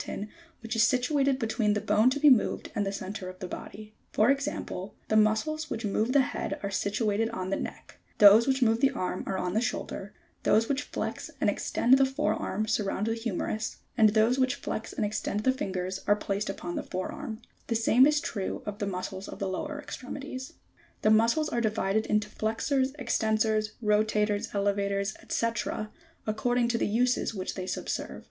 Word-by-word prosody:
ton 210 - -5 0.3
which 225 0 -4
is 225 - +3
situated 265 +3 +3
between 220 -3 +1
the 210 - 0
bone 210 +4 +3
to 275 +2 -1
be 300 - +5
moved 255 -6 +3
and 205 -1 -1
the - - -1
centre 195 -1 -5
of 185 - -10
the 185 - -6
body; 215 +3 -9 0.2
for 220 +5 +4
example, 275 -8 -3
the 215 - +2
muscles 255 +9 +2
which 225 0 -3
move 215 +4 0
the 280 +1 +5
head - - -3
are 200 - -2
situated 210 +2 0
on 185 -2 -4
the - - +2
neck; - - -7 0.2
those 210 +3 +8
which 265 -1 +2
move 225 -1 +3
the 275 - +4
arm 185 -8 -3
are 190 - -1
on 180 -1 -2
the 220 - +2
shoulder; 205 -4 -3 0.3
those 220 +2 +3
which 280 0 0
flex - - -4
and - - +3
extend 260 +3 +3
the - - +6
fore 270 +3 0
arm 215 +2 -2
surround 210 -2 0
the 225 - 0
humerus, 225 -1 -3 0.2
and 220 -2 +6
those 220 +4 +3
which 260 -1 +2
flex 220 - -5
and 215 - -1
extend 210 0 -2
the 260 - +3
fingers 190 -8 -3
are 205 - +5
placed 205 0 -2
upon 175 -3 -5
the - - -1
fore 185 0 -4
arm; 225 -7 -6 0.3
the 230 - 0
same 230 +4 +5
is 300 0 +3
true 200 -8 -4
of 205 0 -5
the 205 - -1
muscles 190 +1 -4
of - - -8
the 195 - -2
lower 295 +10 -4
extremities. 260 -1 -7
G4. - - -22 0.5
The 215 - +5
muscles 235 +8 +3
are 235 - 0
divided 220 -1 0
into 210 0 +1
Jtexors, 260 +6 -1
extensors, 220 -3 +1
rotators, 210 -1 +1
elevators, 200 0 0 0.2
&c. 230 - +1 0.8
according 235 +3 +1
to 230 -1 0
the - - +1
uses 240 +1 +1
which 185 -1 -3
they 185 -1 -5
subserve. - - -3
220 Hz, 195 wpm, -28 LUFS, 205-250 Hz, 0.8 s, those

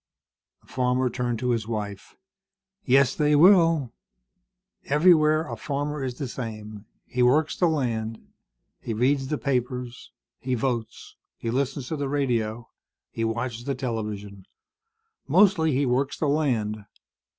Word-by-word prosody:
The - - -28
farmer 125 0 0
turned 120 -1 -2
to 125 +2 -1
his 115 -2 -1
wife. 105 -3 -5 0.7
"Yes, 135 -1 +4
they 150 0 +2
will. 165 - +5 0.9
Everywhere 155 0 +4
a - - -5
farmer 145 0 -3
is 125 -2 -3
the 140 - -4
same. 110 -4 -7 0.2
He 125 - -2
works 145 +6 +3
the 175 - +2
land. 115 -8 -1 0.6
He 115 - -4
reads 135 +4 +1
the 150 - -1
papers. 125 -2 -3 0.3
He 130 0 -2
votes. 120 -2 -4 0.2
He 115 - -3
listens 135 0 -2
to 160 - -2
the 140 -1 -2
radio. 120 -5 -1 0.4
He 115 - -3
watches 115 +1 -3
the 140 -1 -1
television. 105 -6 -5 0.8
Mostly, 180 -6 +4
he 140 +2 +1
works 135 +2 0
the 155 - 0
land. 115 -8 0
125 Hz, 135 wpm, -25 LUFS, 115-145 Hz, 0.9 s, will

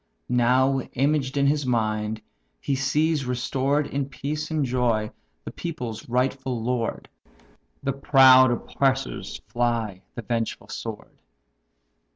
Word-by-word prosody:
Now, 130 +2 +3
imaged 140 0 0
in 140 - +3
his 145 +1 +2
mind, 110 -3 -1 0.4
he 140 - -2
sees 145 +1 +1
restored 135 +3 0
In 140 -1 -3
peace 150 +3 -4
and 155 -3 0
joy 120 -4 0 0.3
the - - -5
people's 125 -10 -6
rightful 130 0 0
lord; 115 0 -2 0.8
The 135 - 0
proud 130 -1 +7
oppressors 130 -4 -1
fly 115 -5 -1
the 120 - -6
vengeful 115 0 -3
sword. - - -7
130 Hz, 115 wpm, -25 LUFS, 120-140 Hz, 0.8 s, proud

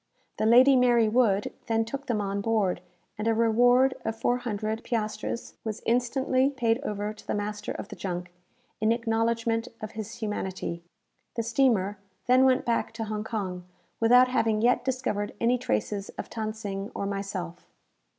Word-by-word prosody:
The 215 - +2
"Lady 255 +4 +7
Mary 240 -3 +4
Wood" 215 -3 +2
then 225 -1 +1
took 275 +5 -6
them 225 -5 0
on 200 0 -2
board, 200 -5 +1 0.4
and 215 - -1
a 225 - +3
reward 245 +3 +4
of 225 - -2
400 225 -2 -1
piastres 215 0 -3
was 220 0 -5
instantly 255 +2 +2
paid 240 -4 +1
over 210 -5 -3
to 215 - -17
the - - -1
master 210 0 -3
of - - -7
the - - -7
junk, 180 -2 -5 0.5
in 215 +1 +2
acknowledgment 230 0 0
of 215 -1 -6
his 220 0 -6
humanity. 190 -5 -4 0.5
The 230 - -1
steamer 225 -5 +2 0.3
then 255 +1 +5
went 260 0 +3
back 230 -1 0
to 230 -1 -4
Hong 210 -1 -3
Kong, 190 -5 -4 0.4
without 245 +2 +6
having 225 -4 +1
yet 245 +1 +3
discovered 250 -6 -2
any 245 +2 +2
traces 200 - -2
of - - -6
Than 215 -1 -3
Sing 200 -2 -5
or 200 - -2
myself. 195 -3 -5
225 Hz, 160 wpm, -27 LUFS, 205-240 Hz, 0.5 s, Lady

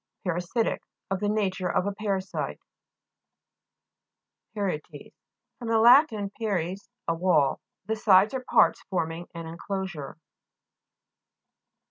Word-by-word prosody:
PARASI'TIC 180 +6 -1 0.3
Of 195 - 0
the 205 - 0
nature 190 -4 0
of 180 - +1
a 200 - 0
para 200 -2 -1
site. 190 - -4 2.0
PARI'ETES 160 -7 -4 0.5
fr. 240 - -7
lat. 245 +7 +7 0.3
paries, 195 -3 -2 0.2
a 165 - +2
wall. 165 -5 +2 0.3
The 220 +2 -1
sides 205 -1 +5
or 260 -1 -3
parts - - +3
forming 170 -2 -2
an 165 0 -6
en 165 +1 -8
closure. 190 -9 -5
190 Hz, 110 wpm, -27 LUFS, 170-210 Hz, 2.0 s, lat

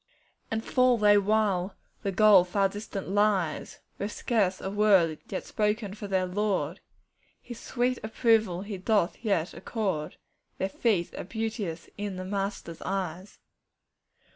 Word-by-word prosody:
'And 225 0 -2
fall 255 -1 +3
they 210 -1 +5
while 200 -2 +1 0.3
the 200 - -1
goal 200 -1 +7
far 195 +2 +1
distant 200 0 -6
lies, 200 -5 0 0.2
With 205 +1 -2
scarce 200 -7 0
a 190 - -4
word 195 -6 +4
yet 190 - -4
spoken 210 -1 -1
for 205 0 -7
their 190 -1 +1
Lord 185 -3 -1 0.6
His 240 -2 -10
sweet 250 0 -1
approval 220 -5 +2
He 200 -2 -6
doth 205 0 +1
yet 190 -6 0
accord; 190 -10 -3 0.4
Their 190 - -1
"feet" 195 -5 0
are - - -5
beauteous 210 -5 -4
in 205 -2 -3
the 185 0 -5
Master's 195 -4 -4
eyes. 190 -1 -4
200 Hz, 140 wpm, -28 LUFS, 185-215 Hz, 0.6 s, goal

